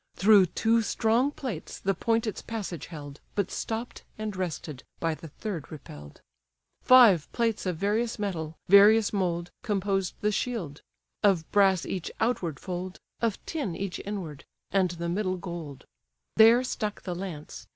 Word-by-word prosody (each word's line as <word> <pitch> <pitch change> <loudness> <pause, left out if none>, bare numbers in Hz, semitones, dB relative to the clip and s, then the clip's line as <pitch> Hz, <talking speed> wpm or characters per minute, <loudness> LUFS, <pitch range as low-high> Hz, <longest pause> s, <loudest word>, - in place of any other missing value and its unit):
Through 200 -1 +6
two 230 +6 +2
strong 225 +4 +2
plates 255 - -6
the 195 - 0
point 225 +5 0
its 215 - -4
passage 200 -8 -5
held, 145 -3 -9 0.2
But 200 -2 -1
stopp'd, 225 +2 -4 0.2
and 215 -2 -4
rested, 160 -6 -4 0.2
by 165 -1 0
the 165 - -9
third 170 0 -6
repell'd. 75 - -11 0.6
Five 230 - +6
plates 230 -4 0
of 180 -3 -1
various 220 +5 0
metal, 165 -7 -4
various 205 +3 +7
mould, 175 -3 -1
Composed 195 -2 -1
the 210 - +2
shield; 200 - -3 0.4
of 190 -6 +3
brass 195 -3 +4
each 185 -3 -4
outward 180 - -1
fold, 185 0 -5 0.2
Of 230 -3 +1
tin 280 - -3
each 195 0 -4
inward, 185 -8 -6 0.3
and 190 -2 +3
the 170 0 -4
middle 185 +1 -1
gold: 170 -7 -7 0.5
There 230 +3 +7
stuck 215 -4 -3
the 180 - -3
lance. 175 -4 -7
195 Hz, 150 wpm, -28 LUFS, 170-220 Hz, 0.6 s, various